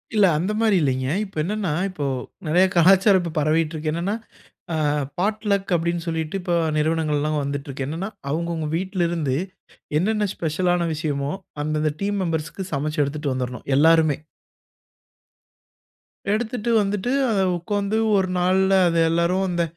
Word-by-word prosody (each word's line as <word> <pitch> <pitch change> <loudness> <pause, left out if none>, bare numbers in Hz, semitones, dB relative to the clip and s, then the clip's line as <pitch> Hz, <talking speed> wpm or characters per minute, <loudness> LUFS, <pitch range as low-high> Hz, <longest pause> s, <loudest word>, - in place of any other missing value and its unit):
இல்ல. 210 - +6
அந்த 185 +6 -1
மாரி 220 -3 +4
இல்லைங்க. 130 -2 0 0.2
இப்ப 195 - -16
என்னன்னா, 195 -3 -1 0.2
இப்போ 150 -6 -4 0.4
நெறைய 180 +5 +4
கலாச்சாரம் 190 +1 +5
பரவிட்டு 155 +1 +1
இருக்கு. 155 0 -2
என்னன்னா, 175 +6 -1 0.6
ஆ - - 0 0.4
பாட் 215 +4 -1
லக் 195 -1 0
அப்டின்னு 170 +1 -1
சொல்லிட்டு 160 0 -2
இப்ப 175 -1 -2 0.2
நிறுவனங்கள்லாம் 155 -1 0
வந்துட்டு 140 0 -4
இருக்கு. 135 0 -4
என்னன்னா 165 +7 -4 0.2
அவங்கவுங்க 165 +1 -2
வீட்ல 190 +1 -3
இருந்து 155 -6 -1 0.6
என்னன்ன 210 +3 +1
ஸ்பெஷல் 165 +3 -1
ஆன 170 -1 0
விஷயமோ 145 -2 -2 0.3
அந்தந்த 155 0 0
டீம் 200 0 0
மெம்பர்ஸ்க்கு 165 +3 -3
சமைச்சு 150 +2 -1
எடுத்துட்டு 145 0 -2
வந்துறணும் 125 -1 -4
எல்லாருமே. 160 -1 +5 2.2
எடுத்துட்டு 235 +1 -1
வந்துட்டு 205 +3 -1 0.2
அத 210 -3 +1 0.2
உட்காந்து 200 +4 -1 0.2
ஒரு 190 -1 +2
நாள்ல 190 +2 +3
அது 170 -1 +1
எல்லாரும் 170 +3 +1
அந்த 175 -1 0
170 Hz, 135 wpm, -23 LUFS, 155-195 Hz, 2.2 s, இல்ல